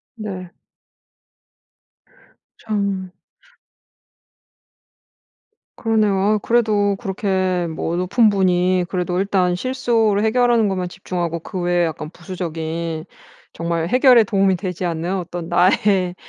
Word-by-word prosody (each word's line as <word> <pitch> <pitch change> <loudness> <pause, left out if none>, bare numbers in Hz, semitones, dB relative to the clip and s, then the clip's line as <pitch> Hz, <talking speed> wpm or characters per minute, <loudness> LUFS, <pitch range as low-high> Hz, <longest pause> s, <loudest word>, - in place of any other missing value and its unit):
네. 190 -5 -7 2.1
참. 200 -4 -3 2.6
그러네요. 220 -3 +1
아우 210 +2 +2
그래도 210 -3 +2
그렇게 190 -3 -1
뭐 165 +1 -3
높은 210 +5 +3
분이 185 -2 +2
그래도 180 -1 -2
일단 190 -2 +1
실수를 225 -2 +1
해결하는 235 -1 +3
것만 185 -2 -2
집중하고 175 -2 -4
그 185 +3 -6
외에 175 0 +1
약간 155 -1 -4
부수적인 165 -2 -5 0.5
정말 170 0 -2
해결에 250 0 +6
도움이 195 -2 +2
되지 180 -1 -5
않는 170 +1 -2
어떤 175 -2 -5
나의 185 0 +2
185 Hz, 230 characters per minute, -20 LUFS, 175-210 Hz, 2.6 s, 해결에